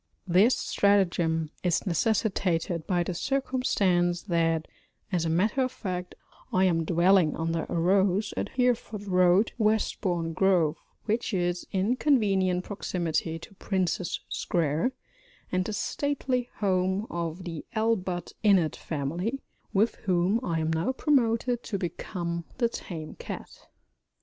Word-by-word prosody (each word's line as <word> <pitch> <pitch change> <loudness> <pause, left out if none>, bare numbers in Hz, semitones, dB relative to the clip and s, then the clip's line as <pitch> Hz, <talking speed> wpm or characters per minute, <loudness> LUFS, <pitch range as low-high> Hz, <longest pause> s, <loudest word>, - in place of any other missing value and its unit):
This 195 +8 +5
stratagem 170 -6 +2
is 175 -2 +1
necessitated 180 -3 0
by 180 -3 +2
the 180 - -3
circumstance 190 -8 +1
that 165 -4 +1 0.4
(as 175 -3 +1
a - - 0
matter 205 +10 +2
of 255 -1 0
fact) 180 -6 -5 0.4
I 185 - +3
am 165 -3 +2
dwelling 175 -1 +4
under 165 0 -1
a - - -2
rose 190 +4 +2
at - - -2
Hereford 240 -4 +1
Road, 185 +2 +4
Westbourne 185 -6 0
Grove, 175 -4 +3 0.3
which 225 0 -1
is 175 -1 -1
in 200 +6 +1
convenient 195 -10 +2
proximity 170 -5 -2
to 165 - -12
Prince's 185 -3 -1
Square 165 - 0 0.6
and 185 0 +1
the 215 - -3
stately 255 +1 -1
home 190 0 +1
of 170 +1 -3
the 165 -4 -6
ALLBUTT 195 -5 -1
INNETT 190 -7 +4
family, 170 - -3 0.3
with 210 +4 +2
whom 185 +3 +2
I 165 -5 -1
am 160 +1 0
now 165 +11 0
promoted 245 -4 +1
to 210 - -3
become 170 -1 -4
the 235 -2 +2
tame 160 -8 -7
cat. - - -8
185 Hz, 130 wpm, -28 LUFS, 170-215 Hz, 0.6 s, This